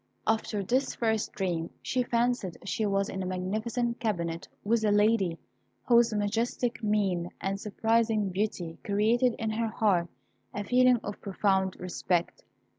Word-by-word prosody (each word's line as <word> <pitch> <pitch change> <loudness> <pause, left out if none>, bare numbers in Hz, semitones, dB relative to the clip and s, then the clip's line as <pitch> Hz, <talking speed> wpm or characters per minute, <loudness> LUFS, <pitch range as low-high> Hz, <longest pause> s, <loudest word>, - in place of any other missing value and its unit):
After 220 -2 0
this 255 +8 0
first 220 -2 0
dream, 175 -4 -2
she 255 - 0
fancied 240 -6 0
she 215 +2 -1
was 195 0 +1
in 190 - -4
a - - -3
magnificent 220 +6 -2
cabinet 170 -7 -2 0.2
with 220 +2 +1
a 210 - +3
lady, 205 -4 +3 0.5
whose 235 -1 +5
majestic 225 +3 -1
mien 195 -5 0
and 195 +1 -2
surprising 220 0 +1
beauty 185 -4 -3
created 225 +4 +2
in 220 -1 -2
her 225 +1 -1
heart 200 -6 +1 0.5
a 205 - -2
feeling 250 +3 +4
of 205 - -6
profound 190 -1 0
respect. 180 -1 -1
210 Hz, 140 wpm, -29 LUFS, 190-230 Hz, 0.5 s, whose